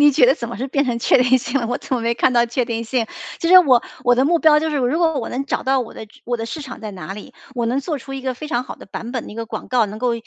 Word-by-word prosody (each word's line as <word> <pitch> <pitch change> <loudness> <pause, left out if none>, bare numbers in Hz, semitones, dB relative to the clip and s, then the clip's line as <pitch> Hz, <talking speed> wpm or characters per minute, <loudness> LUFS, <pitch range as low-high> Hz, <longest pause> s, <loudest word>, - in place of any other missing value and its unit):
你 290 -1 +7
觉 260 -2 +5
得 260 - +5
怎 235 -6 -6
么 235 - -6
是 255 +6 -3
变 280 +1 +1
成 245 -3 -1
确 240 - +4
定 255 +1 +4
性 255 +3 -2
了？ 230 - -2
我 245 - -1
怎 - - -4
么 250 - -1
没 230 +1 0
看 245 +2 +2
到 240 -1 +3
确 240 +2 -1
定 230 0 -3
性？ 235 0 0 0.3
其 335 - -1
实 370 +1 +10
我 260 -9 +5 0.2
我 245 0 +5
的 255 +2 +2
目 340 +3 +3
标 310 -2 +5
就 320 0 -1
是， 300 - -1
如 265 +3 +1
果 325 -4 +2
我 235 - -4
能 265 +3 -3
找 - - -2
到 265 0 +2
我 240 - -6
的 220 - -9
直 205 - -21
我 240 0 -1
的 225 -1 -5
市 290 +6 -6
场 260 -4 -9
在 215 -2 -6
哪 190 0 -7
里， 210 +6 -11 0.2
我 240 -2 -1
能 250 +4 0
做 300 +1 -3
出 270 +2 -10
一 270 - -5
个 260 -1 -1
非 255 +5 -8
常 245 -5 -1
好 - - -9
的 - - -13
版 230 +4 -6
本 245 - -4
的 - - -9
一 - - -11
个 230 +1 -4
广 - - -7
告， 245 -3 +3
能 210 +1 -8
够 245 0 +1
250 Hz, 380 characters per minute, -20 LUFS, 235-275 Hz, 0.3 s, 实